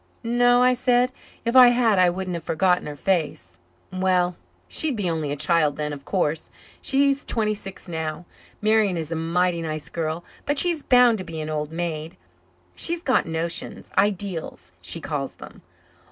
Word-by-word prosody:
"No," 245 +1 +3
I 255 0 +5
said. 250 0 +2 0.3
"If 235 +2 -1
I 255 -1 +10
had 240 -5 +3
I 180 -1 +5
wouldn't 185 +1 -4
have 170 -1 -5
forgotten 180 +2 +1
her 150 - -6
face." 145 - -2 0.3
"Well, 185 -1 +1 0.3
she'd 310 -5 +1
be 205 -4 -2
only 160 -4 -2
a - - -1
kid 155 -1 +1
then, 150 -1 -3
of 140 -1 -9
course. 160 -5 -1 0.3
She's 275 0 +2
twenty 215 -2 0
six 195 -2 -9
now. 160 0 -4 0.4
Marian 215 -4 +3
is 160 -1 -5
a - - -1
mighty 170 +1 0
nice 155 -1 -5
girl, 165 0 -3 0.2
but 290 0 0
she's 340 0 +4
bound 245 -4 +4
to - - -4
be 165 -3 -7
an 155 0 -4
old 150 0 -3
maid. 165 -1 -4 0.6
She's 340 0 0
got 260 - +2
notions 165 +1 -4
ideals, 195 -3 -1
she - - -4
calls - - -4
'em. - - -12
180 Hz, 170 wpm, -23 LUFS, 160-235 Hz, 0.6 s, I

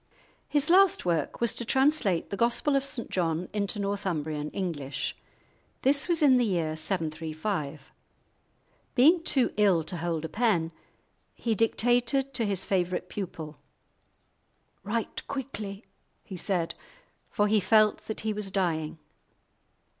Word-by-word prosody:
His 295 +2 +2
last 385 - +5
work 165 -4 -1
was 235 -2 +1
to - - -4
translate 265 - +2
the - - -1
Gospel 235 +6 +1
of 275 - +2
St 260 -4 -3
John 170 -1 -1
into 205 0 -1
Northumbrian 165 -7 -2
English. 145 -8 -3 0.7
This 280 +4 +4
was 340 -3 +1
in 265 -3 +6
the 245 - +3
year 170 -7 0
735. 160 -2 -3 1.0
Being 315 +7 +6
too 265 -6 +2
ill 195 -6 +4
to 175 +3 -3
hold 165 -1 -2
a - - -2
pen, 185 -5 +1 0.6
he 230 - -1
dictated 245 +5 +1
to 240 -3 +1
his 195 -2 0
favourite 180 -1 -1
pupil. 160 -6 -6 1.3
"Write 215 +3 -3
quickly," 220 -7 -5 0.4
he 190 - -8
said, 175 -2 -1 0.6
for 205 - +1
he 215 +1 +3
felt 215 +2 +3
that 220 - -4
he 220 0 -1
was 210 -1 -3
dying. 165 -5 -1
200 Hz, 130 wpm, -28 LUFS, 165-240 Hz, 1.3 s, in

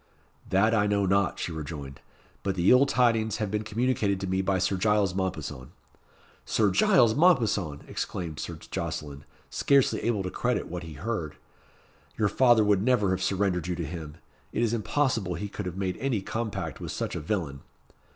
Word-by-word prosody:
"That 110 +4 +3
I 105 -2 +3
know 100 -1 +1
not," 100 0 +2
she - - -3
rejoined. 75 -3 -7 0.4
"But 95 -1 -2
the 90 0 +3
ill 130 +2 +6
tidings 115 -4 +2
have 105 -4 -2
been 105 0 0
communicated 110 -2 0
to 95 - -3
me 95 +1 0
by 95 0 +1
Sir 95 +2 +1
Giles 105 -1 +2
Mompesson." 80 -9 -4 0.7
"Sir 105 -3 +2
Giles 110 +4 +4
Mompesson!" 110 - +2
exclaimed 80 -6 -4
Sir - - -5
Jocelyn, 70 -1 -6 0.3
scarcely 140 -2 +2
able 110 -4 0
to 90 - -4
credit 125 -2 -1
what 90 0 -5
he 80 -2 -8
heard. 85 -1 -4 0.8
"Your 105 -2 +2
father 120 0 +5
would 105 -2 +3
never 110 -4 +2
have 95 0 -1
surrendered 95 -3 0
you 90 - -1
to 85 -1 -3
him. 75 -1 -7 0.4
It 120 - 0
is 115 -1 +1
impossible 115 -5 0
he 105 - -4
could 100 -1 -5
have 90 0 -6
made 95 -2 -2
any 125 -7 -1
compact 110 +1 -4
with - - -5
such - - -3
a - - -2
villain." 75 -5 -3
100 Hz, 180 wpm, -27 LUFS, 90-110 Hz, 0.8 s, ill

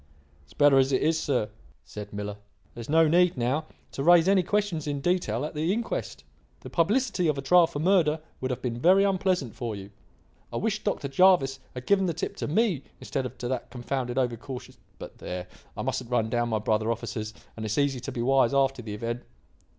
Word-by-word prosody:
"It's 70 - -20
better 145 -2 +6
as 135 +1 +3
it 130 - +2
is, 160 +1 +2
sir," 130 -9 0 0.4
said 105 -1 -8
Miller. 105 0 -5 0.4
"There 120 - -8
is 115 - -9
no 160 +1 +5
need, 175 0 +3
now, 130 +6 0 0.3
to - - -5
raise 170 +3 +6
any 195 -1 +5
questions 185 -5 -1
in 145 -1 -2
detail 145 -7 0
at 155 - -6
the 160 +3 0
inquest. 230 +3 -3 0.4
The - - -10
publicity 205 +1 +1
of 150 -2 +1
a - - -2
trial 175 +3 +6
for - - -7
murder 160 -2 +3 0.2
would 130 - -2
have 125 - -4
been 120 -2 -2
very 185 +8 +5
unpleasant 185 - 0
for 115 -3 -4
you. 100 0 -9 0.6
I - - -3
wish 215 0 -1
Dr. 200 -8 -1
Jervis 135 -3 +4 0.2
had 125 0 -7
given 195 -2 +3
the 170 - -2
tip 165 - -4
to - - -3
me 180 - +1 0.2
instead 130 - -3
of 125 - -14
to 120 - -4
that 130 -2 -3
confounded, 125 0 -3
over 125 -3 +1
cautious 130 +2 -9 0.2
but - - -10
there, 90 0 -5 0.3
I - - -3
mustn't - - -3
run 115 -3 0
down 120 -1 0
my 110 - +1
brother 110 +1 0
officers: 115 -1 -4 0.2
and 110 - -6
it's 110 -1 -2
easy 140 -3 +1
to 130 +3 -6
be 120 -3 -3
wise 135 0 +3
after 135 -2 +2
the 105 -3 -6
event. 115 +3 -4
135 Hz, 215 wpm, -27 LUFS, 120-170 Hz, 0.6 s, better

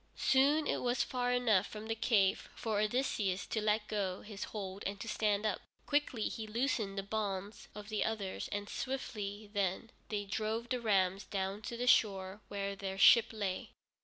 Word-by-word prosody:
Soon 285 +4 +4
it - - 0
was 240 -1 +1
far 245 0 -1
enough 225 -6 +3
from 215 0 -8
the 225 - 0
cave 215 -4 +2
for 220 -3 -1
Odysseus 210 -4 0
to 220 - -2
let 210 0 +1
go 195 -3 -2
his 210 -2 -6
hold 195 -2 -6
and 200 0 -4
to 230 - -6
stand 210 -1 +1
up. 210 - 0 0.2
Quickly 285 -6 +1
he 220 -2 -5
loosened 220 -3 -1
the 195 - -1
bonds 200 -1 -3
of 210 0 -8
the 215 -1 0
others, 205 -4 -2
and 205 0 -3
swiftly 210 -6 -4
then 200 +2 -1 0.2
they 205 -1 -2
drove 220 +3 -2
the 250 -2 -1
rams 195 -3 +2
down 195 +1 -2
to 235 +2 -5
the 245 - -1
shore 195 -4 +3
where 200 -1 -3
their 195 -1 -4
ship 230 +3 +8
lay. 200 -4 -3
210 Hz, 180 wpm, -34 LUFS, 195-230 Hz, 0.2 s, ship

